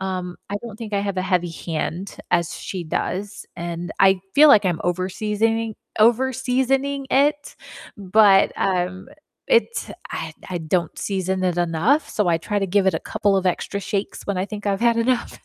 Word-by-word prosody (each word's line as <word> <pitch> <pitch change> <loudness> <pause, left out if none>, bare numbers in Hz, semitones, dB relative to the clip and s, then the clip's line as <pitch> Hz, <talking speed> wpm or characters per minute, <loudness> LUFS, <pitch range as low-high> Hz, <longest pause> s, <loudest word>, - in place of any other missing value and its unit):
Um, 185 -2 -4
I 205 - -1
don't 235 -3 -8
think 220 -2 -8
I - - +2
have 200 -1 -3
a 185 - 0
heavy 180 -2 0
hand 170 +3 -4 0.2
as 170 -1 +2
she 185 -3 -5
does, 195 +5 -4
and 170 0 -5
I 190 -1 +5
feel 305 +2 +8
like 215 -8 +7
I'm 175 -3 0
overseasoning 210 +5 -1 0.3
overseasoning 265 +3 +2
it, 290 +2 +1 0.4
but, 195 0 +5
um, 185 +1 -1 0.4
it's 470 -1 +1 0.2
I 160 -1 -5 0.2
I 180 - -3
don't 170 0 -1
season 190 -1 -2
it 175 -1 0
enough, 185 - +1
so 210 -4 0
I 165 -1 +2
try 205 +5 -2
to 195 - 0
give 195 +1 +2
it 190 - +3
a 160 - -1
couple 200 -1 0
of 190 - 0
extra 190 +2 -1
shakes 200 +1 -3
when 200 -2 -1
I 185 - 0
think 210 0 -7
I've 195 -1 0
had 235 -1 +3
enough. 240 +1 0
195 Hz, 180 wpm, -22 LUFS, 180-225 Hz, 0.4 s, feel